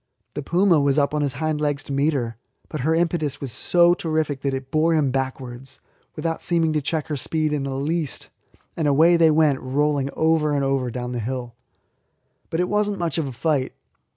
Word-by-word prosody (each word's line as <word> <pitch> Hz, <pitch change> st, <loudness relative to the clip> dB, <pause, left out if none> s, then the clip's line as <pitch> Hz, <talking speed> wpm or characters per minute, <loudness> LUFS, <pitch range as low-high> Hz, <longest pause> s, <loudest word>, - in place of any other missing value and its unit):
The 145 Hz, -, -4 dB
puma 170 Hz, +2 st, +3 dB
was 140 Hz, 0 st, +2 dB
up 145 Hz, 0 st, +2 dB
on 150 Hz, -, 0 dB
his 140 Hz, -3 st, 0 dB
hind 155 Hz, -1 st, -1 dB
legs 145 Hz, -2 st, -1 dB
to 140 Hz, -, -6 dB
meet 145 Hz, +3 st, +2 dB
her, 120 Hz, -4 st, -2 dB, 0.3 s
but 155 Hz, -, -5 dB
her 160 Hz, +5 st, +2 dB
impetus 165 Hz, -4 st, 0 dB
was 135 Hz, -3 st, -4 dB
so 175 Hz, +5 st, +4 dB
terrific 155 Hz, -5 st, -2 dB
that 135 Hz, -1 st, -1 dB
it 135 Hz, 0 st, -7 dB
bore 160 Hz, +1 st, +3 dB
him 145 Hz, -4 st, +2 dB
backwards, 130 Hz, -1 st, -5 dB, 0.4 s
without 165 Hz, +1 st, -3 dB
seeming 165 Hz, -2 st, +1 dB
to 150 Hz, -, +1 dB
check 155 Hz, +2 st, -2 dB
her 150 Hz, -, -1 dB
speed 155 Hz, +2 st, -1 dB
in 150 Hz, -, -1 dB
the 135 Hz, -1 st, -3 dB
least, 150 Hz, +1 st, -3 dB, 0.5 s
and 160 Hz, -3 st, 0 dB
away 160 Hz, +5 st, +5 dB
they 165 Hz, -1 st, +5 dB
went 150 Hz, -3 st, +3 dB
rolling 140 Hz, +1 st, 0 dB
over 160 Hz, -2 st, +2 dB
and 140 Hz, -1 st, +1 dB
over 135 Hz, -2 st, 0 dB
down 125 Hz, +1 st, -5 dB
the 120 Hz, -, -3 dB
hill. 120 Hz, +1 st, -4 dB, 1.0 s
But 165 Hz, -, -2 dB
it 180 Hz, -, +1 dB
was 210 Hz, +1 st, +1 dB
not 205 Hz, -, -3 dB
much 170 Hz, -3 st, -1 dB
of 155 Hz, -, -1 dB
a -, -, -5 dB
fight. 135 Hz, +1 st, -1 dB
150 Hz, 210 wpm, -23 LUFS, 135-160 Hz, 1.0 s, away